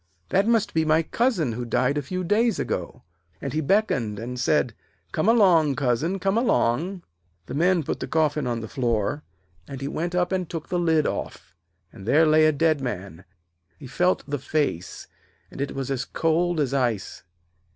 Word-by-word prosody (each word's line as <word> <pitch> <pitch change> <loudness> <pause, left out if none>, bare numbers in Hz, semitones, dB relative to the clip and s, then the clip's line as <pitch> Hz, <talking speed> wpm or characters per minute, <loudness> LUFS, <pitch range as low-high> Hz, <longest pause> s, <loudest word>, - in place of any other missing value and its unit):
That 195 +3 +2
must 225 -3 +2
be 160 - +2
my 160 +1 +3
cousin 195 - 0
who 120 +2 -4
died 125 +3 +1
a 145 - 0
few 185 +7 -4
days 215 +3 +2
ago.' - - -4 0.4
And 140 -2 -5
he 155 - 0
beckoned 135 - +1
and 120 +3 -5
said: 125 -1 +1 0.4
'Come 155 +8 +1
along, 175 - +4
cousin, 145 +7 0
come 195 +3 +1
along.' 175 - 0 0.4
The - - -7
men 175 +3 +2
put - - -3
the - - -4
coffin 150 -3 +1
on 120 -1 -2
the 110 - -6
floor, 120 +3 -1 0.5
and 135 - -7
he 135 - -4
went 170 +4 -3
up 180 0 +1
and 185 -3 -1
took 165 -3 -6
the 180 - 0
lid 160 -3 +2
off, - - -5 0.4
and 100 -2 -11
there 160 +5 +5
lay 155 0 +5
a - - +4
dead 155 0 +1
man. 95 -8 -6 0.5
He 145 - -11
felt 180 +8 +1
the 145 -1 -2
face, 130 - -2 0.5
and - - -7
it 140 - -3
was 135 0 -3
as 130 -2 -1
cold 165 +1 0
as 140 -3 0
ice. 120 -7 -1
155 Hz, 185 wpm, -24 LUFS, 125-175 Hz, 0.5 s, there